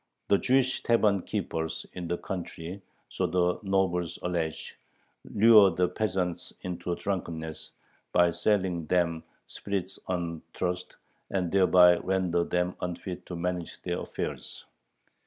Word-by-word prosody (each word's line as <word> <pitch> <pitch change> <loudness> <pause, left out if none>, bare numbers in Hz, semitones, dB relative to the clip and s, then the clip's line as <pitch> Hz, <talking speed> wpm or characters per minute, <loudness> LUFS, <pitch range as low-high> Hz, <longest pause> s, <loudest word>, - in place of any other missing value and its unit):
The 100 - +5
Jewish 130 0 +2
tavern 105 -4 +3
keepers 80 -6 -3
in 90 -1 -5
the 85 - -1
country, 90 0 -6 0.3
so - - -1
the 90 -1 +1
nobles 95 -4 0
allege, 85 -3 -2 0.5
"lure 105 -2 +7
the 90 +1 +1
peasants 90 -3 -2
into 90 -1 -3
drunkenness," 80 -5 -4 0.4
by 90 -1 +4
selling 90 -5 0
them 85 -2 +1 0.2
spirits 95 -2 -4
on 85 -3 -2
trust, 90 0 -3 0.3
and 90 -3 -1
thereby 90 -2 +6
"render 90 -2 +1
them 90 +1 -1
unfit 90 0 -5
to 90 - -5
manage 90 0 -3
their - - -2
affairs." - - -5
90 Hz, 120 wpm, -28 LUFS, 85-95 Hz, 0.5 s, lure